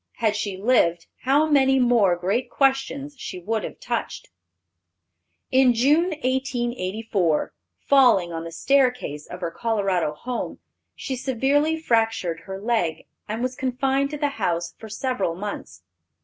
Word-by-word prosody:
Had 220 -2 0
she 205 -3 -3
lived, 175 -6 +2 0.2
how 280 +4 +4
many 270 -3 +4
more 235 -7 +4
great 195 +8 -1
questions 275 +1 0
she - - -6
would 215 +5 -2
have - - -7
touched. - - -4 1.2
In 260 -2 +5
June, 290 +8 +4 0.2
1884, 235 - -1 0.3
falling 245 -11 +4
on 165 0 -4
the 165 - -7
staircase 250 - +1
of 180 +1 -9
her 170 -1 -2
Colorado 195 -8 0
home, 250 +8 -4 0.4
she 265 - -4
severely 275 +5 +1
fractured 225 - 0
her 190 0 -6
leg, 195 -8 -1 0.2
and 220 +3 -2
was 255 0 -2
confined 265 +2 0
to 300 - -5
the 290 -1 0
house 170 -2 -1
for 220 - -9
several 215 -6 -2
months. 185 - -7
235 Hz, 135 wpm, -24 LUFS, 185-265 Hz, 1.2 s, In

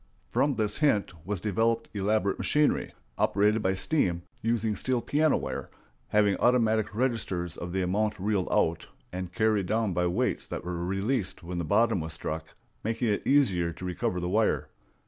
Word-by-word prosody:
From 140 -1 +2
this 105 -2 -1
hint 125 -12 +2
was 105 -2 -2
developed 115 +4 0
elaborate 100 -1 0
machinery, 150 0 +1 0.3
operated 105 +3 +3
by 95 -1 +1
steam, 95 - +1 0.2
using 115 -2 0
steel 130 +2 0
piano 150 +5 +2
wire, - - -5 0.4
having 105 -2 +3
automatic 110 -4 +2
registers 100 -8 -1
of 85 - -6
the 95 +1 0
amount 105 +4 0
reeled 100 -1 0
out, 80 0 +1 0.3
and 90 -1 -4
carried 105 -1 +1
down 110 -2 +1
by 90 0 +1
weights 85 - -1
that - - -5
were 85 -1 -3
released 95 +1 -1
when 90 +1 -4
the - - -1
bottom 110 +4 +3
was 80 0 -4
struck, 80 0 -5 0.3
making 115 +2 0
it 105 - -1
easier 95 -12 +3
to 90 - -8
recover 90 0 -1
the 90 - -2
wire. 110 +3 +1
105 Hz, 165 wpm, -28 LUFS, 90-115 Hz, 0.4 s, operated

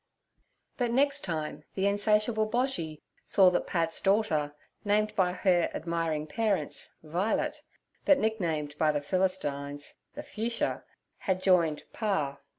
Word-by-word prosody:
But 245 -2 0
next 280 +4 +2
time 155 -3 -3
the 195 - 0
insatiable 215 +2 +2
Boshy 215 - -2 0.2
saw 190 -3 +5
that 180 - -1
Pat's 165 -2 0
daughter, 165 -8 +1 0.3
named 210 +1 +1
by 185 -3 +3
her 180 -2 +2
admiring 165 -2 -2
parents 205 +4 -1
'Vi'let' 220 - -1 0.4
but 290 - +5
nicknamed 170 - -1
by 155 -1 +4
the 145 -1 -1
Philistines 145 -5 -1 0.2
'The - - -6
Fuchsia' 230 +2 -2 0.4
had 190 -1 0
joined 170 -5 +3
'Pa.' 175 -11 -1
185 Hz, 125 wpm, -29 LUFS, 155-215 Hz, 0.4 s, saw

